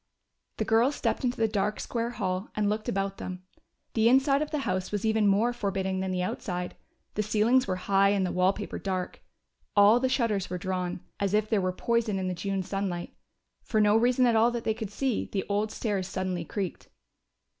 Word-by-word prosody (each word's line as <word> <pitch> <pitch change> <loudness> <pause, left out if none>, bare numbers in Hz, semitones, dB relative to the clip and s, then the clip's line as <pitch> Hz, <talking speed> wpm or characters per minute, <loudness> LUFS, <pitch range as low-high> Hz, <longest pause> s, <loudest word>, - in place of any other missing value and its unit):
The 220 - -1
girls 235 +6 +3
stepped - - -1
into 250 0 0
the 225 - +2
dark 210 0 -1
square 235 -1 -2
hall 185 -4 -3
and 210 -1 +1
looked 215 +1 -1
about 195 0 -1
them. 185 0 -6 0.5
The 225 0 +4
inside 275 +2 +4
of 305 - -2
the 305 - -2
house 185 0 -1
was 205 0 -2
even 220 -1 +3
more 215 +5 +3
forbidding 195 -4 -2
than 190 0 -2
the 180 -1 -1
outside. 180 -1 -4 0.4
The 210 - 0
ceilings 220 +4 +3
were 185 - 0
high 195 +2 +3
and 200 -2 +2
the 180 - -2
wall 185 +1 +3
paper 205 +1 -6
dark. 185 -2 -3 0.5
All 205 +3 +7
the 260 +1 +1
shutters 225 -7 0
were 180 - -3
drawn, 180 -1 -3 0.2
as 200 0 +1
if 215 0 +1
there 215 -3 +3
were 185 0 0
poison 225 +1 0
in 190 -1 -2
the 185 - -1
June 195 +2 -2
sunlight. 190 -2 -3 0.5
For 220 - 0
no 210 0 +5
reason 245 +3 +4
at 235 -2 +3
all 225 +2 +5
that 240 -1 -3
they 220 - +1
could 220 -2 -5
see, 250 +2 -1
the 195 - -2
old 210 +1 0
stairs 200 -6 -2
suddenly 185 -3 -3
creaked. 190 +1 -5
205 Hz, 210 wpm, -28 LUFS, 185-225 Hz, 0.5 s, All